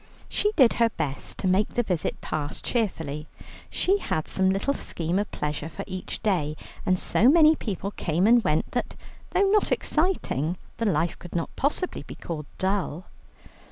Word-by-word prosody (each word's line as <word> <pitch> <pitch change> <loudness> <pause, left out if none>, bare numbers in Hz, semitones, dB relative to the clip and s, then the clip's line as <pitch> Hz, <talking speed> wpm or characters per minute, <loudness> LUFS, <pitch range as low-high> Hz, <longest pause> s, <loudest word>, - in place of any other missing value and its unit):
She 420 - +1
did 255 -6 +6
her 230 - +6
best 140 -9 -4
to 190 - -1
make 190 +3 +3
the 240 - +2
visit 180 -7 -1
pass 150 -2 -3
cheerfully; 160 - -2 0.4
she 390 +2 +2
had 155 - -2
some 190 0 +2
little 195 +9 +1
scheme 175 - -1
of 210 - -2
pleasure 150 +1 -3
for 195 - -6
each 185 -1 -6
day, 165 -8 +1 0.3
and 185 - +4
so 230 +6 +3
many 315 0 +7
people 200 - -4
came 170 -1 0
and 235 +1 +6
went 155 -4 +1
that, 245 - -2 0.3
though 390 0 +3
not 420 0 +3
exciting, 185 - 0 0.2
the 230 - 0
life 170 -2 0
could 175 -2 -10
not 165 - -2
possibly 300 +6 -1
be - - -9
called 150 -4 -6
dull. 190 -3 -1
190 Hz, 170 wpm, -26 LUFS, 160-240 Hz, 0.4 s, many